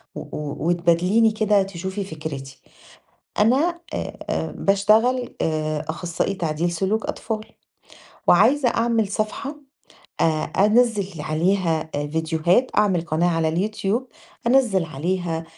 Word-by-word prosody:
و -, -, -5 dB
و 150 Hz, +2 st, -5 dB
وتبادليني 175 Hz, +6 st, +3 dB
كده 210 Hz, -2 st, +2 dB
تشوفي 190 Hz, +1 st, -5 dB
فكرتي؛ 150 Hz, -5 st, -7 dB, 0.8 s
أنا 285 Hz, +11 st, +3 dB
آآ -, -, -3 dB, 0.2 s
آآ -, -, -1 dB
باشتغل 220 Hz, +6 st, +2 dB
آآ 155 Hz, -1 st, -1 dB
أخصائي 170 Hz, +3 st, -2 dB
تعديل 170 Hz, -1 st, -1 dB
سلوك 195 Hz, +6 st, -1 dB
أطفال، 215 Hz, -1 st, -4 dB, 0.8 s
وعايزة 245 Hz, +8 st, +5 dB
أعمل 230 Hz, -2 st, +1 dB
صفحة 215 Hz, +8 st, -3 dB, 0.7 s
آآ -, -, +4 dB, 0.2 s
أنزِّل 205 Hz, -2 st, +2 dB
عليها 160 Hz, 0 st, 0 dB
آآ 145 Hz, 0 st, -1 dB
فيديوهات 160 Hz, -, +1 dB
أعمل 200 Hz, -5 st, +3 dB
قناة 165 Hz, +1 st, 0 dB
على 160 Hz, -1 st, +1 dB
اليوتيوب 210 Hz, +7 st, -1 dB, 0.4 s
أنزِّل 235 Hz, -8 st, +3 dB
عليها 165 Hz, +2 st, -2 dB
190 Hz, 110 wpm, -22 LUFS, 160-215 Hz, 0.8 s, وعايزة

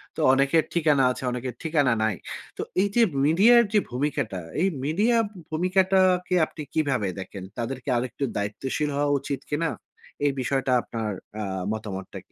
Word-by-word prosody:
তো -, -, -8 dB
অনেকের 140 Hz, +4 st, +3 dB
ঠিকানা 150 Hz, -5 st, +3 dB
আছে, 130 Hz, -, -6 dB
অনেকের 125 Hz, 0 st, -4 dB
ঠিকানা 145 Hz, -6 st, +2 dB
নাই। 110 Hz, -4 st, +1 dB, 0.4 s
তো -, -, -3 dB, 0.2 s
এইযে 205 Hz, +4 st, +2 dB, 0.2 s
মিডিয়ার 215 Hz, +10 st, +6 dB
যে 210 Hz, -, +6 dB
ভূমিকাটা, 125 Hz, -8 st, -2 dB, 0.2 s
এই 190 Hz, -, +4 dB, 0.2 s
মিডিয়া 210 Hz, +10 st, +2 dB, 0.3 s
ভূমিকাটাকে 185 Hz, +1 st, +2 dB
আপনি 155 Hz, -, -10 dB
কিভাবে 135 Hz, -10 st, +1 dB
দেখেন? 95 Hz, 0 st, -7 dB
তাদের 120 Hz, +2 st, -3 dB
কি -, -, -5 dB
আরেকটু 125 Hz, +3 st, -3 dB
দায়িত্বশীল 130 Hz, +8 st, -2 dB
হওয়া 145 Hz, 0 st, +1 dB
উচিত 140 Hz, 0 st, -4 dB
কিনা? 160 Hz, +2 st, 0 dB, 0.6 s
এই 145 Hz, -, +4 dB
বিষয়টা 135 Hz, 0 st, 0 dB
আপনার 110 Hz, -2 st, -4 dB, 0.3 s
আ -, -, -2 dB, 0.3 s
মতামতটা 100 Hz, -3 st, -5 dB
কি? -, -, -43 dB
145 Hz, 150 wpm, -25 LUFS, 120-170 Hz, 0.6 s, মিডিয়ার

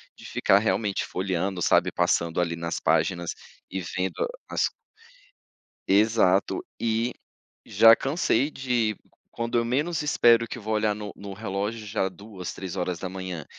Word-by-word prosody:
de -, -, -14 dB
ficar 100 Hz, -, +3 dB
realmente 105 Hz, -1 st, 0 dB
folheando, 95 Hz, 0 st, -2 dB
sabe, -, -, +3 dB
passando 85 Hz, -1 st, +1 dB
ali 85 Hz, -1 st, 0 dB
nas 85 Hz, 0 st, -3 dB
páginas 85 Hz, -2 st, +1 dB, 0.4 s
e 95 Hz, 0 st, -3 dB
vendo 90 Hz, +2 st, -2 dB, 0.2 s
as -, -, +1 dB, 1.2 s
Exato, 100 Hz, -2 st, +3 dB, 0.2 s
e 115 Hz, +1 st, 0 dB, 0.5 s
já 115 Hz, 0 st, +7 dB
cansei 145 Hz, 0 st, +1 dB
de 120 Hz, -5 st, 0 dB
qu -, -, -29 dB, 0.2 s
quando 115 Hz, 0 st, -1 dB
eu 115 Hz, -, +1 dB
menos 145 Hz, +8 st, 0 dB
espero 120 Hz, -5 st, +4 dB
que -, -, -7 dB
vou 110 Hz, -1 st, -4 dB
olhar 105 Hz, -1 st, +1 dB
no 105 Hz, -1 st, -7 dB
no 100 Hz, -1 st, -8 dB
relógio 105 Hz, +2 st, -3 dB
já 105 Hz, -2 st, 0 dB
2, 95 Hz, -1 st, -8 dB
3 90 Hz, -2 st, -4 dB
100 Hz, 135 wpm, -26 LUFS, 95-115 Hz, 1.2 s, já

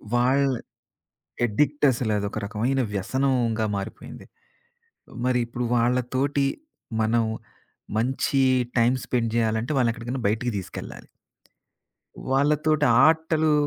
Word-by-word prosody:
వాళ్ళ 130 Hz, +3 st, +3 dB, 1.0 s
అడిక్టసల 130 Hz, 0 st, +1 dB
అదొక 100 Hz, 0 st, -4 dB
రకమైన 120 Hz, +6 st, 0 dB
వ్యసనంగా 120 Hz, +1 st, 0 dB
మారిపోయింది. 100 Hz, -, -8 dB, 1.0 s
మరి 125 Hz, -1 st, +2 dB
ఇప్పుడు 120 Hz, +1 st, -4 dB
వాళ్ళతోటి 125 Hz, +4 st, +1 dB, 0.5 s
మనం 115 Hz, +1 st, +2 dB, 0.7 s
మంచి 130 Hz, +3 st, 0 dB, 0.4 s
టైమ్ 120 Hz, +2 st, +3 dB
స్పెండ్ 115 Hz, -2 st, -1 dB
చేయాలంటే 115 Hz, +3 st, 0 dB
వాళ్ళు 120 Hz, -2 st, +3 dB
ఎక్కడికైనా 120 Hz, +2 st, -5 dB
బయటికి 115 Hz, +3 st, -1 dB
తీసుకెళ్ళాలి. 95 Hz, -, -8 dB, 1.2 s
వాళ్ళతోటి 150 Hz, +2 st, +2 dB, 0.2 s
ఆటలు 160 Hz, -1 st, +2 dB
125 Hz, 90 wpm, -24 LUFS, 115-140 Hz, 1.2 s, వాళ్ళ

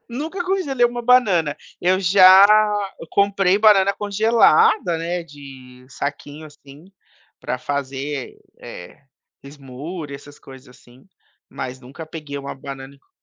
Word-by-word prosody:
Nunca 315 Hz, +9 st, -5 dB
congelei 340 Hz, -10 st, 0 dB
uma 240 Hz, 0 st, -1 dB
banana, 195 Hz, -, +2 dB, 0.2 s
eu 185 Hz, +1 st, +1 dB
já 190 Hz, +1 st, +7 dB, 0.7 s
comprei 200 Hz, -1 st, +2 dB
banana 200 Hz, -2 st, +4 dB
congelada, 215 Hz, -, +2 dB
né, 170 Hz, +2 st, -4 dB
de 135 Hz, -4 st, -15 dB
saquinho 145 Hz, +2 st, -7 dB
assim, 145 Hz, 0 st, -16 dB, 0.6 s
pra 125 Hz, -, -4 dB
fazer, 140 Hz, 0 st, -5 dB, 0.2 s
eh, 90 Hz, -, -12 dB, 0.4 s
smoothie, 140 Hz, +3 st, -9 dB
essas 145 Hz, +1 st, -13 dB
coisas 135 Hz, -1 st, -15 dB
assim, 125 Hz, +5 st, -21 dB, 0.4 s
mas 130 Hz, 0 st, -7 dB
nunca 135 Hz, +6 st, -11 dB
peguei 155 Hz, -2 st, -9 dB
uma 140 Hz, 0 st, -7 dB
banana 135 Hz, 0 st, -10 dB
e -, -, -23 dB
con -, -, -40 dB
155 Hz, 120 wpm, -20 LUFS, 140-200 Hz, 0.7 s, já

